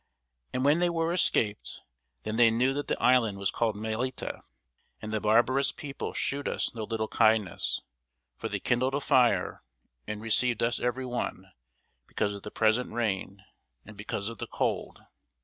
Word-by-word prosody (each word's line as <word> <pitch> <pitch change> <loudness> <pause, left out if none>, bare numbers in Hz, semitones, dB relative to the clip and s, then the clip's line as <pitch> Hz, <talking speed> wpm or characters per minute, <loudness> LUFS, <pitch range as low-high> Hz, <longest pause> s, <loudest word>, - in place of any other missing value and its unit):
And 130 +1 -1
when 150 +4 +4
they 175 0 +3
were 165 0 0
escaped, 110 - +1 0.4
then 110 - -3
they 120 -1 +7
knew 125 +4 +2
that 145 +1 -3
the - - -1
island 120 -5 +3
was 100 -1 0
called 115 -3 0
Melita. 110 +5 -3 0.6
And 110 0 -6
the 110 - 0
barbarous 120 +5 +3
people 140 -1 -6
shewed 140 +1 -1
us - - -1
no 110 -2 -4
little 110 0 -2
kindness: 110 -5 +2 0.5
for - - -5
they - - -2
kindled 130 +2 +1
a - - +1
fire, 130 -4 +2 0.5
and 105 0 -4
received 115 +2 +1
us 120 +1 +1
every 125 +2 -1
one, 95 -6 -4 0.6
because 100 - -1
of 100 - -7
the 105 - -7
present 110 +3 +1
rain, 100 -4 -2 0.4
and 110 - -12
because 100 0 -4
of 115 -2 -6
the - - -4
cold. - - -2
115 Hz, 165 wpm, -29 LUFS, 105-130 Hz, 0.6 s, they